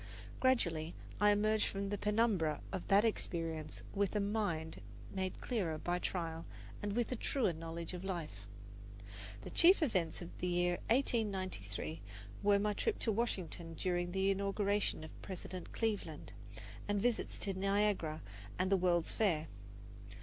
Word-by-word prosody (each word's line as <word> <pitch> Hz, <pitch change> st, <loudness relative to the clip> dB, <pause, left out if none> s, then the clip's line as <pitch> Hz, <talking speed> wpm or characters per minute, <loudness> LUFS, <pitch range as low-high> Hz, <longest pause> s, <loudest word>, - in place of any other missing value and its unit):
Gradually 170 Hz, -11 st, +2 dB, 0.2 s
I 210 Hz, -, +6 dB
emerged 215 Hz, +1 st, +3 dB
from 200 Hz, 0 st, -2 dB
the 205 Hz, -, -1 dB
penumbra 210 Hz, -8 st, +2 dB
of 185 Hz, -, -4 dB
that 200 Hz, +2 st, +6 dB
experience 165 Hz, -7 st, -2 dB
with 200 Hz, +1 st, +1 dB
a -, -, +3 dB
mind 200 Hz, -6 st, -1 dB, 0.3 s
made 190 Hz, -1 st, -2 dB
clearer 185 Hz, -10 st, -1 dB
by 175 Hz, +3 st, -1 dB
trial 165 Hz, -3 st, -2 dB, 0.4 s
and 205 Hz, -1 st, -1 dB
with 240 Hz, 0 st, +1 dB
a -, -, +1 dB
truer 230 Hz, -4 st, +1 dB
knowledge 165 Hz, +2 st, -5 dB
of 180 Hz, 0 st, -5 dB
life. 155 Hz, -, -4 dB, 1.0 s
The -, -, -7 dB
chief 355 Hz, 0 st, +6 dB
events 185 Hz, -, +1 dB
of 175 Hz, -1 st, -8 dB
the 180 Hz, -, -1 dB
year 175 Hz, 0 st, +2 dB
1893 185 Hz, -, 0 dB, 0.4 s
were 205 Hz, 0 st, +5 dB
my 210 Hz, +1 st, +1 dB
trip 430 Hz, -, 0 dB
to 225 Hz, -, +1 dB
Washington 185 Hz, -7 st, -2 dB
during 175 Hz, 0 st, 0 dB
the 190 Hz, +1 st, +2 dB
inauguration 200 Hz, -2 st, +1 dB
of 155 Hz, -, -10 dB
President 185 Hz, -1 st, -6 dB
Cleveland, 220 Hz, -3 st, -2 dB, 0.5 s
and 205 Hz, 0 st, +1 dB
visits 235 Hz, +2 st, 0 dB
to 195 Hz, -, -1 dB
Niagara 195 Hz, -5 st, +1 dB, 0.3 s
and 185 Hz, +1 st, +1 dB
the 195 Hz, -, +6 dB
World's 175 Hz, -2 st, +2 dB
Fair. 165 Hz, -8 st, +2 dB
190 Hz, 145 wpm, -36 LUFS, 170-210 Hz, 1.0 s, I